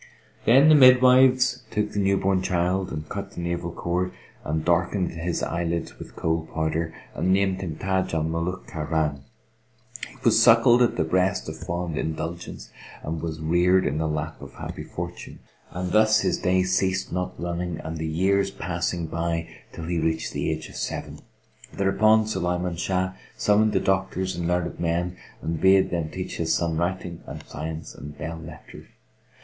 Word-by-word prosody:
Then 135 +6 +6
the 155 - +8
midwives 130 -1 +6
took 105 0 -1
the 105 - -2
newborn 95 -1 +2
child 90 +1 0
and 75 0 -5
cut 100 +2 -6
the - - -7
navel 85 0 -3
cord 90 +2 -2 0.3
and 80 +1 -2
darkened 90 +2 +1
his 85 +1 -3
eyelids 85 0 -2
with - - -10
Kohl 80 0 -1
powder[FN#466] 80 +1 -1 0.2
and 95 - 0
named 95 0 +2
him 85 -5 -4
Táj 95 +2 -1
al 80 - +1
Mulúk 85 +3 -2
Khárán.[FN#467] 75 -2 -1 0.9
He - - -17
was 115 -1 +5
suckled 120 +1 +6
at 120 - +3
the - - +1
breast 95 +4 +1
of 80 0 -6
fond 85 -1 -3
indulgence 80 +2 -5 0.3
and 80 0 -4
was 80 -1 -4
reared 90 +3 +3
in 75 - -1
the 80 - 0
lap 75 0 -3
of - - -11
happy - - -6
fortune; - - -7 0.3
and 90 0 -4
thus 110 +1 +5
his - - 0
days 95 0 +2
ceased 95 -1 0
not 90 0 -3
running 85 -1 -3
and 80 +1 -5
the 80 0 -3
years 95 +5 +2
passing 85 -2 -3
by 85 0 -2 0.2
till 85 - -7
he 85 0 -1
reached 80 0 -1
the - - -1
age - - -3
of - - -11
seven. - - -4 0.5
Thereupon 110 +3 +3
Sulayman 90 -4 -2
Shah 95 0 0 0.2
summoned 105 +1 +3
the 95 - +3
doctors 95 -1 0
and 85 -1 -2
learned 90 0 -1
men 85 +1 -1 0.3
and 80 0 -2
bade 95 0 +5
them 85 -3 -1
teach 90 +3 -5
his 80 -1 +1
son 85 -2 0
writing 85 0 -2
and - - -8
science 80 0 -6
and 75 0 -10
belle 80 +2 -5
lettres. 80 -1 -12
90 Hz, 170 wpm, -25 LUFS, 80-95 Hz, 0.9 s, the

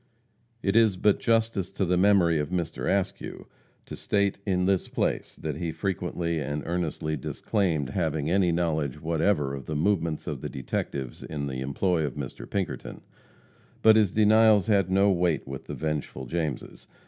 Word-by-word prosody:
It 100 +1 +1
is 110 -5 +4
but 105 +2 +3
justice 115 -5 +1
to 95 - 0
the 90 +1 +1
memory 90 -4 +4
of 75 0 -2
Mr. 85 -3 -2
Askew, 100 0 -2 0.4
to - - -7
state 100 -1 0
in 90 -2 +1
this 95 -1 +1
place - - -2
that - - -4
he 85 -2 -2
frequently 85 -3 -2
and 75 0 -3
earnestly 80 -2 -2
disclaimed 80 - -1
having 80 -3 -1
any 90 0 +3
knowledge 80 -5 -1
whatever 80 -3 +1
of 70 -2 -7
the 75 - -3
movements 80 -1 0
of - - -4
the - - -4
detectives 65 -1 -4
in 70 -2 -4
the 65 -2 -4
employ 80 +5 0
of 70 -4 -3
Mr. 70 -4 -7
Pinkerton. 100 -2 -4 0.8
But 110 -1 +8
his 105 -4 +4
denials 110 -1 +5
had 100 -4 +2
no 100 +2 +4
weight 85 -5 +1
with 65 -1 -7
the - - -5
vengeful 75 -4 -3
Jameses. 80 -1 -4
85 Hz, 165 wpm, -27 LUFS, 75-100 Hz, 0.8 s, But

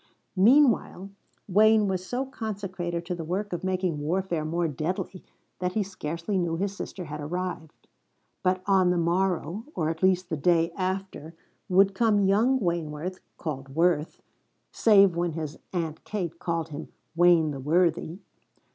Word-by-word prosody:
Meanwhile 220 -3 +3 0.4
Wayne 215 +2 +5
was 185 -1 -1
so 250 +8 -2
consecrated 190 -8 -4
to 180 - -3
the 170 -2 -5
work 190 +5 -3
of 175 - -4
making 185 -4 -1
warfare 170 +1 -1
more 165 +2 -1
deadly 165 +5 -4 0.4
that 180 0 -1
he 215 - +1
scarcely 185 +1 -3
knew 170 -2 -1
his 200 +2 -2
sister 185 -2 -6
had 150 -1 -6
arrived. 170 0 -5 0.5
But 185 0 +1
on 190 -2 +4
the 180 - +2
morrow, 180 +3 0
or 160 -1 0
at 160 - -8
least 185 -1 +2
the 160 - 0
day 165 +2 +2
after, 185 -4 -4 0.3
would 195 +2 +4
come 205 -1 +3
young 225 +7 +3
Wayneworth, 170 -1 -3 0.2
called 135 -4 -6
Worth, 165 -2 +1 0.5
save 200 -5 +5
when 170 -1 -1
his 155 -1 -5
Aunt 165 -4 -3
Kate 175 -5 -4
called 165 -2 -2
him 145 -1 -7 0.3
Wayne 170 -2 +5
the 140 - -6
Worthy. 165 +3 +1
180 Hz, 150 wpm, -27 LUFS, 165-195 Hz, 0.5 s, Wayne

